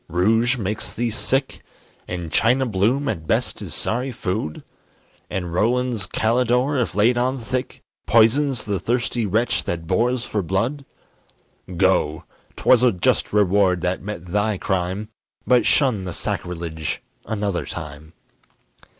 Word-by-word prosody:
rouge 110 +9 +2
makes 105 -1 -4
thee 120 0 -1
sick? 130 +6 -1 0.5
And 85 -3 -5
China 125 - +3
Bloom 120 +6 +1
at 80 - -3
best - - 0
is - - -4
sorry 125 +4 -1
food? 90 -8 -3 0.7
And 90 -3 -3
Rowland's 120 +1 +1
Kalydor, 125 +4 +1
if 110 - -2
laid 120 +4 +3
on 130 +2 0
thick, 125 +2 -4 0.2
Poisons 125 +4 +4
the 100 -3 -1
thirsty 120 +2 -1
wretch 110 +5 +1
that 85 -1 -3
bores 120 +8 +1
for 105 - -2
blood? 115 - -1 0.9
Go! 85 -4 +2 0.3
'twas 125 -2 +5
a 125 -1 +5
just 90 - +1
reward 100 -3 +3
that 90 +1 -1
met 100 -4 -6
thy 105 +3 0
crime; 95 +3 -2 0.4
But 125 -1 +4
shun 120 -10 +2
the 90 - -4
sacrilege 80 -4 -4 0.2
another 100 -4 -2
time. 75 -1 -8
105 Hz, 135 wpm, -22 LUFS, 90-125 Hz, 0.9 s, twas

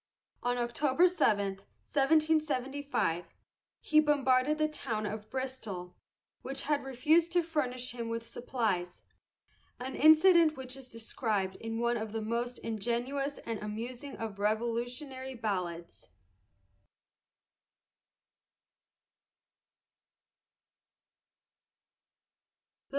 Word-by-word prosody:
On 245 0 0
October 260 +7 +3
7, 205 - +1 0.3
1775, 285 - +1 0.6
he 305 - +4
bombarded 285 -1 +3
the 310 0 +2
town 230 -8 -3
of 210 +1 -5
Bristol, 225 -9 -5 0.5
which 270 +1 -5
had 295 0 0
refused 305 +6 +3
to 350 -1 +4
furnish 255 -6 -2
him 235 -1 -5
with 230 0 -3
supplies, 215 -8 -2 0.8
an 260 +2 -5
incident 315 0 +6
which 255 -1 -7
is 265 -2 -11
described 220 -4 -2
in 225 0 -4
one 235 +1 +1
of 220 -1 -5
the 225 - -2
most 235 +3 -2
ingenuous 240 +6 -2
and 225 -2 -3
amusing 235 +6 -6
of 215 -3 -5
Revolutionary 245 +5 -2
ballads. 180 -7 -4
245 Hz, 90 wpm, -31 LUFS, 220-285 Hz, 0.8 s, incident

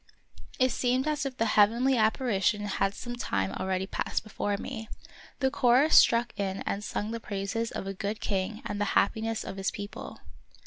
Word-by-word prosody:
It 255 -1 +3
seemed 255 +4 +1
as 300 -2 0
if 260 -1 -8
the 225 - +1
heavenly 230 +5 +4
appari 220 -2 +1
tion 210 +2 +2
had 195 0 0
some 240 -1 -6
time 95 - -1
already 190 - -2
passed - - -2
before 205 -1 -2
me. 225 -1 -6 0.5
The 265 0 +2
chorus 265 +3 +4
struck 235 0 +5
in 195 -1 -2
and 200 - -2
sung 210 +1 -3
the 230 - -3
praises 215 +2 -3
of - - -5
a 195 - -3
good 200 +3 -3
king 200 +2 -2
and 205 0 -3
the - - +2
happiness 225 0 +1
of 195 - -7
his 195 0 0
people. 205 0 -7
215 Hz, 185 wpm, -29 LUFS, 200-245 Hz, 0.5 s, struck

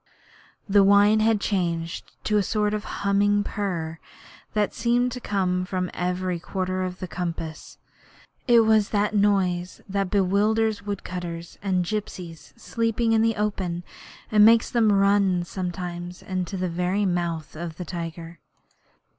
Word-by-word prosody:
The 200 0 +5
whine 205 +2 +5
had 220 -1 +3
changed 170 -4 -2
to 210 - +1
a - - +4
sort 210 +1 0
of 210 0 -3 0.2
humming 205 +1 +3
purr 170 -7 -3 0.6
that 210 -1 +1
seemed 245 +2 +1
to 250 - -5
come 185 -5 0
from 185 -1 -3
every 180 0 -2
quarter 185 +1 -3
of 180 -1 -3
the 185 - -6
compass. 165 -3 -5 0.7
It 235 -2 +7
was 220 -2 +3
the 205 0 +1
noise 190 -4 +1
that 195 -1 -1
bewilders 210 +3 +2
woodcutters 180 -4 -6
and 185 -3 0
gipsies 175 -5 -5
sleeping 230 0 0
in 220 - +4
the 225 0 +2
open, 190 -5 -2 0.5
and 210 -1 +6
makes 230 +1 +5
them 230 -4 +3
run 195 -2 +3
sometimes 175 -1 -5
into 185 0 -3
the 185 0 -1
very 180 +4 0
mouth 170 -4 -2
of 165 0 -6
the 180 - -5
tiger. 170 0 -6
190 Hz, 140 wpm, -25 LUFS, 175-210 Hz, 0.7 s, It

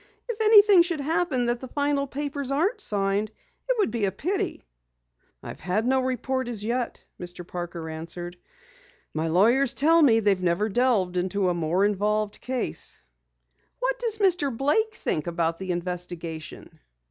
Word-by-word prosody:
"If 460 -2 -4
anything 415 -3 +7
should 340 -2 -1
happen 305 -3 0
that 240 0 0
the 260 - -8
final 285 +1 0
papers 285 0 -4
aren't 360 - 0
signed, 200 - 0 0.4
it - - +2
would 415 - +1
be 230 -4 0
a 195 - 0
pity." 375 - -3 0.8
"I've - - -8
had 190 +6 -1
no 265 +1 +2
report 260 0 -2
as 225 -4 -4
yet," 240 +2 -3
Mr. 175 0 -8
Parker 175 -2 -6
answered. 170 +2 -5 0.8
"My 160 +1 -1
lawyers 235 +10 +3
tell 330 +3 +5
me 235 -7 +5
they 205 -2 +3
never 185 +3 0
delved 205 -6 +1
into 185 +1 0
a - - +1
more 170 +3 +1
involved 210 +1 -1
case." 255 0 0 0.8
"What - - -1
does 460 -3 +1
Mr. 360 -8 +2
Blake 435 - +1
think 155 - -2
about 165 -1 -1
the 190 -1 -6
investigation?" 175 -2 -5
235 Hz, 155 wpm, -25 LUFS, 180-290 Hz, 0.8 s, anything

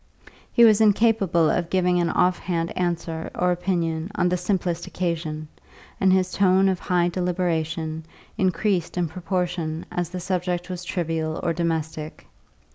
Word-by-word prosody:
He 235 - +5
was 220 -1 +5
incapable 205 -6 +3
of 170 -1 -1
giving 180 -1 +2
an 170 -1 +1
off 180 +2 +2
hand 170 -2 -2
answer 170 -2 -2
or 180 0 +2
opinion 175 -2 -1
on 180 - +2
the 180 - +1
simplest 180 -2 -1
occasion, 160 -3 -3 0.5
and 190 -1 +4
his 185 -1 +2
tone 190 0 +4
of 185 -2 -1
high 175 -1 +1
deliberation 165 -3 -2 0.3
increased 185 -2 0
in 175 -1 +1
proportion 175 -1 -3
as 175 -2 -2
the 180 +1 -5
subject 180 0 -2
was 180 -1 -5
trivial 165 -3 -2
or 170 - +1
domestic. 160 -2 -3
175 Hz, 145 wpm, -24 LUFS, 165-185 Hz, 0.5 s, He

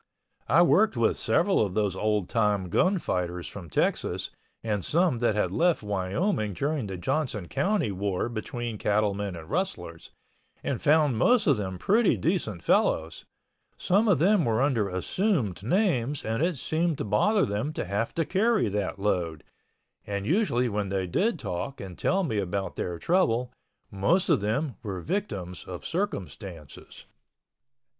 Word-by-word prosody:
I - - +5
worked - - +3
with - - +2
several - - +2
of 95 -3 -3
those 105 -3 +1
old 105 -1 0
time 105 -5 +1
gunfighters 90 - 0
from 90 -5 -9
Texas - - -1 0.3
and 105 -4 -1
some 165 -6 +2
that 120 -3 +1
had 95 -4 0
left 170 - +2
Wyoming 105 - -1
during 140 - -2
the 95 -1 -5
Johnson 105 - -2
County 190 - 0
war 95 0 -1
between 120 -1 -5
cattlemen 100 -2 0
and 80 -2 -9
rustlers, 165 - -3 0.5
and - - -2
found 150 -6 +3
most 240 - +4
of 145 - +4
them 95 -3 -4
pretty 215 - +3
decent 135 - -1
fellows. 80 +1 +1 0.5
Some 205 +5 +2
of 200 - +4
them 190 +4 +3
were 115 +1 +1
under 115 -8 +1
assumed 105 - -1
names 145 - 0
and 115 +4 -1
it 170 -2 +1
seemed 160 +3 0
to - - -3
bother 195 - +3
them 105 +9 -2
to - - -3
have 100 +5 -2
to 165 - +1
carry 215 - +2
that 100 -1 -2
load—and 100 +2 -5
usually 125 - +2
when 105 -3 -2
they 95 -1 -1
did 200 - 0
talk 135 - -5
and 95 -2 -7
tell 195 - +1
me 110 - -1
about 95 0 -3
their 90 -1 -3
trouble 125 - +1 0.4
most 135 - +1
of - - +3
them 115 +3 -1
were 95 -3 -4
victims 100 - -4
of 90 -2 -8
circumstances. 95 - -5
110 Hz, 150 wpm, -27 LUFS, -, 0.5 s, I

